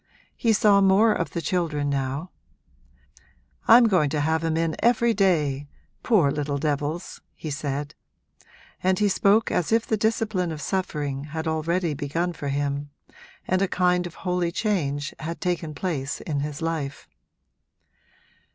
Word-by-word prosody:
He 230 Hz, -, +1 dB
saw 205 Hz, -2 st, +5 dB
more 200 Hz, +3 st, +5 dB
of 170 Hz, -, -2 dB
the 170 Hz, -, -4 dB
children 160 Hz, -5 st, -1 dB
now; 140 Hz, +4 st, -2 dB, 1.4 s
'I'm 240 Hz, +2 st, +8 dB
going 180 Hz, -8 st, +3 dB
to 150 Hz, +1 st, -1 dB
have 160 Hz, +2 st, +1 dB
'em 160 Hz, -1 st, 0 dB
in 165 Hz, -1 st, 0 dB
every 235 Hz, 0 st, +3 dB
day, 150 Hz, -9 st, +1 dB, 0.3 s
poor 180 Hz, -, +3 dB
little 145 Hz, -1 st, -2 dB
devils,' 150 Hz, +4 st, -3 dB
he 155 Hz, -, -6 dB
said; 145 Hz, 0 st, -3 dB, 0.9 s
and 185 Hz, 0 st, +2 dB
he 210 Hz, -, +3 dB
spoke 200 Hz, +3 st, +3 dB
as 180 Hz, -, 0 dB
if 225 Hz, 0 st, +3 dB
the 220 Hz, -, 0 dB
discipline 215 Hz, -5 st, 0 dB
of 155 Hz, -, -5 dB
suffering 150 Hz, -7 st, -2 dB
had 160 Hz, +2 st, -5 dB
already 160 Hz, +1 st, 0 dB
begun 165 Hz, +5 st, -2 dB
for 150 Hz, -3 st, -6 dB
him 140 Hz, +1 st, -2 dB, 0.6 s
and 185 Hz, 0 st, +1 dB
a 195 Hz, -, +3 dB
kind 180 Hz, -1 st, +1 dB
of 170 Hz, -, -12 dB
holy 180 Hz, -1 st, 0 dB
change 150 Hz, -9 st, -1 dB
had 165 Hz, +1 st, -5 dB
taken 165 Hz, -4 st, -2 dB
place 145 Hz, -5 st, -3 dB
in 150 Hz, -3 st, -2 dB
his 145 Hz, +2 st, -4 dB
life. 155 Hz, -4 st, -3 dB
165 Hz, 150 wpm, -25 LUFS, 145-185 Hz, 1.4 s, I'm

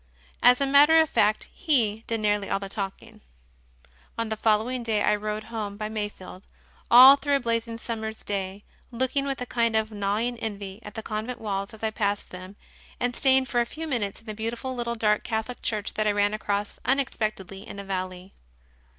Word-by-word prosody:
As 250 Hz, 0 st, +6 dB
a 280 Hz, -, +2 dB
matter 290 Hz, +4 st, +6 dB
of 320 Hz, -2 st, +2 dB
fact, 210 Hz, +1 st, +2 dB
he 225 Hz, -, +1 dB
did 225 Hz, -1 st, -1 dB
nearly 205 Hz, -1 st, +1 dB
all -, -, +1 dB
the 195 Hz, 0 st, -6 dB
talking. 195 Hz, -1 st, -6 dB, 1.0 s
On 230 Hz, -1 st, -2 dB
the 220 Hz, -, -1 dB
following 220 Hz, +4 st, +1 dB
day 220 Hz, -3 st, 0 dB
I -, -, +3 dB
rode 210 Hz, +1 st, -4 dB
home 205 Hz, -2 st, -4 dB
by 215 Hz, 0 st, -4 dB
Mayfield, 205 Hz, -3 st, -6 dB, 0.4 s
all 260 Hz, +3 st, +10 dB
through 285 Hz, 0 st, +1 dB
a -, -, +2 dB
blazing 230 Hz, -2 st, -2 dB
summer 225 Hz, -1 st, -4 dB
s 220 Hz, 0 st, -8 dB
day, 195 Hz, 0 st, -3 dB, 0.3 s
looking 260 Hz, +3 st, 0 dB
with 275 Hz, -1 st, -2 dB
a -, -, -2 dB
kind 230 Hz, -2 st, 0 dB
of 220 Hz, 0 st, +1 dB
gnawing 215 Hz, +4 st, -1 dB
envy 200 Hz, -2 st, -5 dB
at 210 Hz, -2 st, -11 dB
the 220 Hz, -, -5 dB
convent 220 Hz, +4 st, -4 dB
walls 200 Hz, -1 st, -3 dB
as 220 Hz, -, -17 dB
I 220 Hz, -, 0 dB
passed 205 Hz, -2 st, -2 dB
them, 185 Hz, +2 st, -9 dB, 0.4 s
and 245 Hz, 0 st, -1 dB
staying 265 Hz, -1 st, +4 dB
for 240 Hz, -2 st, +1 dB
a -, -, +1 dB
few 320 Hz, +5 st, -6 dB
minutes 225 Hz, -6 st, -2 dB
in -, -, -24 dB
a -, -, -6 dB
beautiful 230 Hz, +4 st, -4 dB
little 235 Hz, -1 st, -3 dB
dark 210 Hz, -2 st, +1 dB
Catholic 220 Hz, +2 st, -3 dB
Church 215 Hz, -1 st, -2 dB
that 215 Hz, 0 st, 0 dB
I -, -, +4 dB
ran 205 Hz, 0 st, +2 dB
across 205 Hz, -1 st, -3 dB
unexpectedly 215 Hz, -7 st, -2 dB
in -, -, -8 dB
a 200 Hz, -, -6 dB
valley. 185 Hz, -1 st, -5 dB
220 Hz, 200 wpm, -26 LUFS, 205-240 Hz, 1.0 s, all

